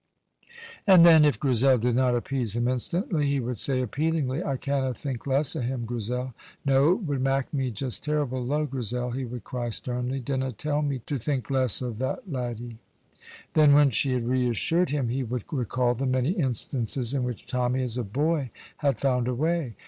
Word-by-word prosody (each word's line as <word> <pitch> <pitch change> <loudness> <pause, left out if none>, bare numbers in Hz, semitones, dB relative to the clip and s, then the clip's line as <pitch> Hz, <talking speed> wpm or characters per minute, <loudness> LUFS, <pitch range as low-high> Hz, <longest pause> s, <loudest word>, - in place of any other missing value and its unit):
And 185 -4 +8
then, 160 -2 +8
if 145 -7 +3
Grizel 130 -1 +3
did 120 +1 0
not 125 -1 +3
appease 120 -3 -1
him 120 +1 0
instantly, 155 - 0
he 140 -1 +1
would 120 -3 -3
say 130 -2 +1
appealingly, 150 - -1
"I 135 -2 -2
canna 135 -2 -1
think 135 -1 -5
less 140 +3 +2
o' 155 - -2
him, 120 0 -3
Grizel; 120 +2 -3 0.3
no, 140 +4 +4
it 200 - -4
would 145 -6 -2
mak' 135 +1 0
me 135 -3 0
just 125 +2 -3
terrible 145 -4 -1
low. 150 +5 0
Grizel," 125 -2 -3
he 130 +2 -3
would 120 -2 -7
cry 120 0 -4
sternly, 125 +3 -2
"dinna 130 0 -2
tell 150 +7 -1
me 140 -4 -2
to 140 - -3
think 135 +2 -2
less 130 -3 +1
o' 125 - -2
that 130 - -4
laddie." 120 -3 -5 0.7
Then, 150 -2 +6
when 145 -2 +5
she 130 +3 +1
had 120 -2 -1
reassured 130 +8 +1
him, 135 -4 -1
he 130 +3 -1
would 125 0 -3
recall 125 -3 0
the 130 +3 -2
many 130 +3 +1
instances 130 - 0
in 135 -2 0
which 125 -3 -5
Tommy 125 0 0
as 120 -2 -4
a 125 - -2
boy 145 +6 -1 0.3
had 140 -2 0
found 125 -3 +1
a 125 - -1
way. 155 -4 -1
130 Hz, 195 wpm, -26 LUFS, 125-140 Hz, 0.7 s, And